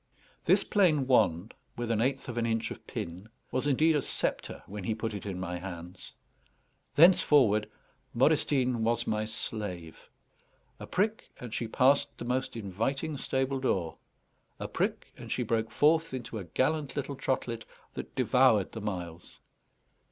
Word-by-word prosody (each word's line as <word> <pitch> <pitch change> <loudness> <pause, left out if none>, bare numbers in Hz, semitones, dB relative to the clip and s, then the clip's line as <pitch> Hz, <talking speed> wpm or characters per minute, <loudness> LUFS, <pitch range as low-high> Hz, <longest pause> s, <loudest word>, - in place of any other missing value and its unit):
This - - +4
plain 165 -9 +3
wand, 105 -7 +2 0.2
with 120 -1 -2
an 110 -1 +1
eighth 135 +2 0
of 120 -1 -3
an 115 - 0
inch 115 0 -1
of - - -9
pin, 90 +6 -6 0.2
was 130 +3 0
indeed 155 +3 +4
a 145 - +2
sceptre - - -3
when 100 0 -7
he 110 +4 -1
put 110 0 -3
it 100 0 -6
in 95 -2 -4
my 90 -1 -4
hands. 90 0 -8 0.8
Thenceforward 140 - +5 0.4
Modestine 130 -2 +2
was 115 +1 +1
my 110 0 0
slave. 100 -6 -5 0.7
A - - -8
prick, 215 +4 -1
and 120 -3 -7
she 115 - -2
passed 135 +5 +3
the - - -6
most 130 +1 -1
inviting 115 - -2
stable 135 0 -1
door. 95 -11 -1 0.6
A - - -3
prick, - - -2
and - - -9
she - - 0
broke 110 -1 0
forth 160 -1 +3
into 120 -3 -5
a 95 - -7
gallant 140 - 0
little 140 -1 -3
trotlet 125 -4 -2 0.3
that - - -7
devoured - - +4
the 110 - -6
miles. 90 -5 -6
115 Hz, 155 wpm, -30 LUFS, 105-135 Hz, 0.8 s, Thenceforward